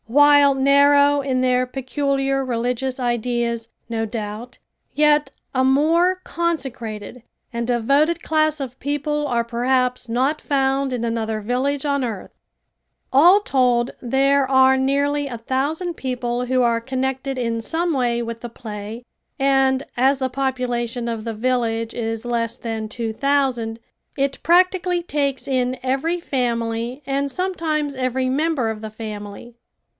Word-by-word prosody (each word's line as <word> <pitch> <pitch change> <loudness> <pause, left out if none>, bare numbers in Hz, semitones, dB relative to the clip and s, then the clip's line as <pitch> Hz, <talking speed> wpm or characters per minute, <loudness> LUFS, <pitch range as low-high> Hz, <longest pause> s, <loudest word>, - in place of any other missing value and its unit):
While 285 +2 +6
narrow 285 +1 +5
in 265 -2 -1
their 255 0 +2
peculiar 270 +1 -1
religious 250 +1 -2
ideas, 240 -1 -1 0.2
no 225 -1 -2
doubt, 220 +2 -6 0.4
yet 300 -1 +3 0.2
a 260 -1 +2
more 330 +7 +3
consecrated 250 -9 -4 0.3
and 235 0 -2
devoted 275 +7 +2
class 310 -1 +1
of 260 -2 -6
people 295 +2 -1
are 235 -3 0
perhaps 250 +1 0
not 265 +6 0
found 270 -1 0
in 240 -2 -2
another 225 -1 -2
village 260 +6 -1
on 280 -2 +1
earth. 220 -6 -5 0.8
All 345 +9 +7
told 250 -7 +2
there 270 +2 +2
are 265 0 +5
nearly 280 +2 +1
a 245 -3 -5
thousand 285 +9 -2
people 250 -3 -3
who 255 0 +2
are 230 -1 +2
connected 265 +1 -2
in 230 -2 -1
some 335 +7 -1
way 240 -3 0
with 230 0 -6
the 240 - -6
play 220 +1 -8 0.3
and 270 -1 +3
as 265 +2 +3
the 260 -1 -1
population 250 -2 -2
of 230 -2 -3
the 230 0 -4
village 230 -1 -1
is 225 -1 -3
less 235 0 -1
than 225 -3 -4
two 230 -1 -4
thousand, 255 -4 0 0.4
it 275 0 -1
practically 360 0 +3
takes 280 -5 -2
in 255 -1 0
every 275 +7 0
family 235 -2 -2
and 275 +1 -1
sometimes 315 -6 -2
every 255 0 -1
member 285 -3 0
of 220 -1 -5
the 220 - -5
family. 215 +1 -8
260 Hz, 140 wpm, -21 LUFS, 235-280 Hz, 0.8 s, All